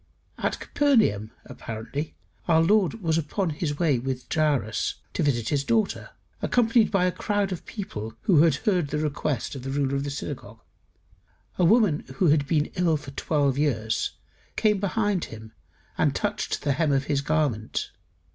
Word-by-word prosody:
At - - -1
Capernaum, 220 - +2 0.2
apparently, 115 +7 -6 0.3
our 165 -2 +5
Lord 205 +2 +2
was 165 -1 +2
upon 165 +3 -1
his 150 -1 -3
way 150 -7 +2
with 130 0 -4
Jairus 145 -9 +1 0.2
to - - -1
visit 120 -6 +1
his 140 -2 +1
daughter, 220 +6 0 0.3
accompanied 230 -2 +3
by 195 -3 +2
a 180 - +2
crowd 205 0 -1
of 180 - -6
people 110 - -6
who 165 - +5
had 160 -4 +4
heard 180 -5 +1
the 150 - -2
request 150 -4 -2
of 135 - -6
the 135 - -5
ruler 135 0 0
of 140 - -1
the 145 - -3
synagogue. 135 - -6 1.0
A 180 - +5
woman 200 -5 +4
who 180 +1 +3
had 145 -1 +3
been 150 -1 +1
ill 175 -4 +2
for 145 -2 -10
twelve 140 -1 0
years, 115 -7 0 0.4
came 210 -2 +2
behind 205 -2 0
him 110 0 -10 0.5
and - - +2
touched - - -2
the 145 - +2
hem 155 +1 +1
of 135 0 +2
his 140 -1 0
garment. 140 -8 -1
150 Hz, 165 wpm, -26 LUFS, 135-185 Hz, 1.0 s, our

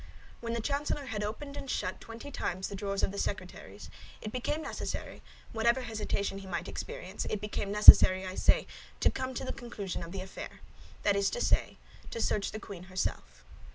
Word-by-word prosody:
When 230 -1 -3
the 235 - -1
chancellor 285 +2 -1
had 220 -4 -3
opened 280 +7 -5
and 275 - -7
shut 185 - -2
twenty 230 +5 -9
times 185 -7 -2
the 200 - -5
drawers 195 0 -2
of - - +2
the 200 - -5
secretaries, - - -5 0.3
it 215 - -6
became 295 +6 -2
necessary, - - -5 0.3
whatever 235 +3 +2
hesitation 210 -4 -2
he 195 - -10
might 175 -2 -3
experience—it 190 +2 -4
became 205 -1 -3
necessary, 190 -2 +10
I 185 - -4
say, - - +3 0.3
to - - +4
come 260 0 -4
to - - -3
the - - -3
conclusion 205 -6 -5
of 170 - -7
the 195 0 -4
affair; 190 - -9 0.4
that 205 - +3
is 200 0 +2
to - - -3
say, - - +1 0.3
to - - -5
search 210 -2 +1
the 215 - -5
queen 190 -5 -9
herself. 185 0 -4
210 Hz, 190 wpm, -31 LUFS, 195-235 Hz, 0.4 s, necessary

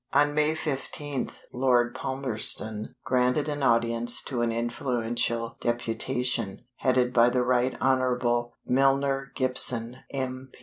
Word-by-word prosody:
On 145 +1 +4
May 150 +1 +2
15th, 145 -2 -3 0.2
Lord 125 -1 +2
Palmerston 110 -5 -2
granted 125 +4 +2
an 145 -1 -3
audience 115 -1 +3
to 125 -3 -2
an 120 -1 +1
influential 120 -1 -1
deputation, 120 -1 -2
headed 125 -1 +1
by 120 0 +5
the 125 0 +1
Right 125 +1 +1
Honorable 125 -2 +1
Milner 135 +1 +2
Gibson, 125 -2 +1
M. 130 -1 -4
125 Hz, 115 wpm, -27 LUFS, 120-135 Hz, 0.2 s, by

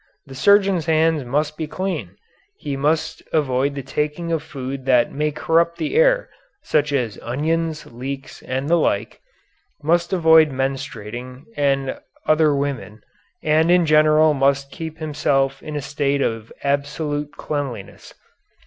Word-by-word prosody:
The 135 - -11
surgeon's 195 +2 +3
hands 160 -2 +2
must 150 +4 -1
be 160 - -3
clean, 185 +4 -4 0.4
he 145 -2 -4
must 150 +4 0
avoid 140 -2 +1
the 140 - -5
taking 150 +5 -2
of 165 -2 0
food 135 -3 -6
that 125 -3 +3
may 150 +1 0
corrupt 165 +3 +1
the 160 -3 -3
air, - - +4 0.4
such 150 -1 +1
as 125 -7 -1
onions, 155 +5 -1
leeks, 135 +3 -7
and 130 +2 -3
the 170 +2 +4
like; 110 -8 -1 0.6
must 170 +3 +2
avoid 160 -3 +6
menstruating 130 -2 -5
and 135 -2 0 0.3
other 155 -1 +3
women, 135 -6 -4 0.4
and 155 +2 +3
in 175 -1 +5
general 155 0 +5
must 140 0 +1
keep 160 +1 -7
himself 145 -3 0
in 150 - -7
a 145 - -2
state 140 0 0
of 115 -1 -3
absolute 145 +1 -2
cleanliness. 135 -9 -5
145 Hz, 140 wpm, -21 LUFS, 135-160 Hz, 0.6 s, avoid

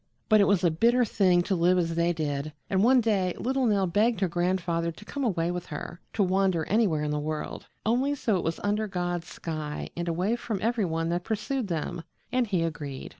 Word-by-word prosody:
But 215 -1 +6
it 200 - +4
was 195 -2 +3
a 170 - +4
bitter 235 +9 +3
thing 185 -4 +3
to 190 - 0
live 180 +1 +3
as 165 -2 0
they 170 +1 +2
did, 150 -2 -3 0.2
and 190 0 +3
one 255 +2 +6
day 195 -5 +1
little 260 0 0
Nell 200 -3 +2
begged 205 +4 +1
her 190 - +3
grandfather 175 -1 0
to 205 +6 -14
come 280 +5 -4
away 175 -7 0
with 180 0 -5
her 170 +3 -6
to 210 - +2
wander 185 -3 +1
anywhere 195 -8 +2
in 150 - -1
the 150 - 0
world, 155 +1 -4 0.2
only 255 +6 +2
so 225 -6 0
it 180 - -1
was 165 0 -2
under 210 +1 0
God's 175 -3 -3
sky 155 -3 -5
and 175 0 -3
away 180 +7 0
from 225 -3 -3
every 225 -1 +1
one 165 -1 -1
that 175 +1 -1
pursued 225 +4 -2
them 170 0 -3 0.3
and 250 -1 +1
he 185 -5 +1
agreed. 145 -5 -5
180 Hz, 220 wpm, -27 LUFS, 165-215 Hz, 0.3 s, But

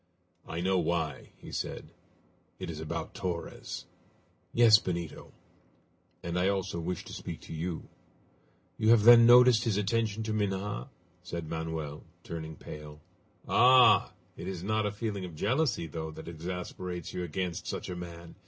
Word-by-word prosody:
"I 80 +1 -4
know 95 +1 +2
why," 80 -5 -1
he - - -11
said; - - -5 0.7
"it - - -5
is 75 - -7
about 80 - -4
Torres." 85 -2 -5 0.7
"Yes, 115 -3 +7
Benito." 85 -5 -5 0.9
"And 85 +1 -2
I 95 +2 +3
also 95 -3 -1
wish 90 +1 -4
to - - -9
speak - - -6
to - - -9
you." 80 +1 -4 0.9
"You 110 - +3
have 115 -2 +6
then 115 0 +9
noticed 125 -1 +7
his 110 -4 0
attention 110 +1 0
to 110 0 -2
Minha?" 105 +3 -2 0.3
said 85 -2 -5
Manoel, 80 -2 -4 0.2
turning 80 -1 -6
pale. 75 0 -10 0.5
"Ah! 130 0 +6 0.2
It - - -7
is 90 -2 -5
not 110 +1 +1
a - - -2
feeling 105 -2 -3
of 90 -3 -7
jealousy, 125 - +1
though, 80 0 -5
that 80 +1 -10
exasperates 90 +1 -5
you - - -3
against 90 +1 -3
such - - -4
a 90 - -4
man?" 85 -1 -8
90 Hz, 155 wpm, -30 LUFS, 80-105 Hz, 0.9 s, then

